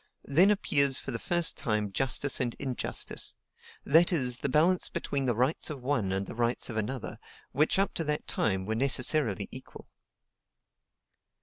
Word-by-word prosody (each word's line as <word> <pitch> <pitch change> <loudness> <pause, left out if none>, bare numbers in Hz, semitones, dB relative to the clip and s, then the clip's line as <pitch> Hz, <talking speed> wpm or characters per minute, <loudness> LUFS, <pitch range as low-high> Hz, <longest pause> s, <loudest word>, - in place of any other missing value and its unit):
Then 170 +8 +4
appears 140 -10 +3
for 135 - -6
the 115 - -4
first 175 -2 0
time 105 -6 -2
justice 135 +5 0
and 120 -2 -1
injustice; 130 -3 -3 0.5
that 165 +6 +4
is, 125 -7 0
the 140 - -2
balance 170 +7 +3
between 140 -1 -3
the 120 -3 0
rights 130 +9 +1
of 140 -5 -7
one 125 -8 0
and 95 +1 -1
the - - -8
rights 120 +1 -1
of - - -7
another, 110 +3 -4 0.3
which 150 +7 +1
up 195 +1 +1
to 165 - -2
that 150 0 -2
time 95 -3 -1
were 110 - -2
necessarily 130 - +2
equal." - - -12
135 Hz, 165 wpm, -29 LUFS, 115-150 Hz, 0.5 s, Then